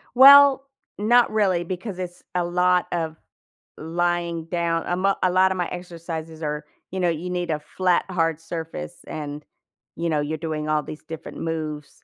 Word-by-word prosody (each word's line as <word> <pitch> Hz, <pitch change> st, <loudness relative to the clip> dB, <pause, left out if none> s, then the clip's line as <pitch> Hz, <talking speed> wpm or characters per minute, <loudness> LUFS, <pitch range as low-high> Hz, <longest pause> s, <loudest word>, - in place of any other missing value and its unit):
Well, 275 Hz, +1 st, +9 dB, 0.3 s
not 235 Hz, +3 st, +4 dB
really 190 Hz, -5 st, +2 dB
because 185 Hz, +3 st, -5 dB
it's 180 Hz, -1 st, -7 dB
a 180 Hz, -, +2 dB
lot 180 Hz, +1 st, +2 dB
of 160 Hz, -2 st, -2 dB, 0.6 s
lying 170 Hz, 0 st, -1 dB
down. 170 Hz, -1 st, -1 dB
A 175 Hz, -, 0 dB
mo 195 Hz, +2 st, +2 dB
a 180 Hz, -, +3 dB
lot 190 Hz, +1 st, +4 dB
of 190 Hz, -, -2 dB
my 175 Hz, -1 st, 0 dB
exercises 165 Hz, -2 st, -7 dB
are, 150 Hz, 0 st, -3 dB, 0.3 s
you 190 Hz, -, -3 dB
know, 175 Hz, -2 st, +2 dB
you 165 Hz, +2 st, -3 dB
need 175 Hz, -1 st, -2 dB
a 150 Hz, -, -1 dB
flat 180 Hz, +4 st, 0 dB
hard 165 Hz, -3 st, 0 dB
surface 165 Hz, -, -6 dB
and, 150 Hz, -1 st, -6 dB, 0.5 s
you 170 Hz, 0 st, -2 dB
know, 150 Hz, -2 st, +1 dB
you're 155 Hz, +2 st, -2 dB
doing 155 Hz, -1 st, -3 dB
all 155 Hz, -1 st, +1 dB
these 155 Hz, -, -9 dB
different 160 Hz, -1 st, -8 dB
moves. 155 Hz, -3 st, -5 dB
170 Hz, 175 wpm, -24 LUFS, 160-180 Hz, 0.6 s, Well